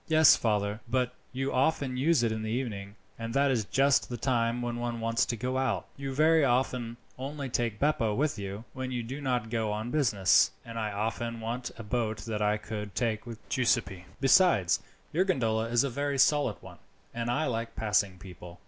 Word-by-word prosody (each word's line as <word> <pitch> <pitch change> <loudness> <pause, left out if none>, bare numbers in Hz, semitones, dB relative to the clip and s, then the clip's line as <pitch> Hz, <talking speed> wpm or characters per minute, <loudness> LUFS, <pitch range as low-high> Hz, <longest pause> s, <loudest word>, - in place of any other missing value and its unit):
"Yes, 160 -1 +7
father, 105 -1 0
but 125 0 0 0.2
you 135 +1 -2
often 135 0 +1
use 140 0 +3
it 115 - +2
in 110 0 -3
the 110 - -3
evening, 105 -5 -3 0.2
and 115 +2 -5
that 140 0 +3
is 115 -5 0
just 135 +5 +2
the 120 - -4
time 120 -1 0
when 120 0 -3
one 120 -1 -3
wants 115 0 +1
to 120 - -1
go 130 +3 -1
out. 130 -3 0
You 140 -1 -5
very 155 +3 +4
often 125 -2 0 0.2
only 140 +1 -4
take 115 -3 -1
Beppo 135 -7 +1
with 145 -3 0
you, 100 +2 -5
when 130 0 -4
you 120 -2 -2
do 135 +5 -6
not 125 -4 -1
go 110 -3 0
on 110 +3 -3
business, 105 -11 +4 0.2
and 115 -1 -6
I 105 -1 -2
often 115 +3 -3
want 120 +2 -4
a 115 - -7
boat 110 0 -1
that 110 0 -4
I 105 0 +2
could 105 -1 -6
take 115 -2 -1
with 115 -2 -10
Giuseppi. 115 -8 0
Besides, 135 - +4 0.3
your 175 +4 +3
gondola 115 - +1
is 115 +2 +2
a 140 - 0
very 140 +2 -1
solid 140 -4 +3
one, - - -12 0.3
and 115 0 -3
I 150 +6 +1
like 115 -3 -3
passing 100 -3 +1
people." 90 -1 -11
120 Hz, 200 wpm, -29 LUFS, 110-130 Hz, 0.3 s, Yes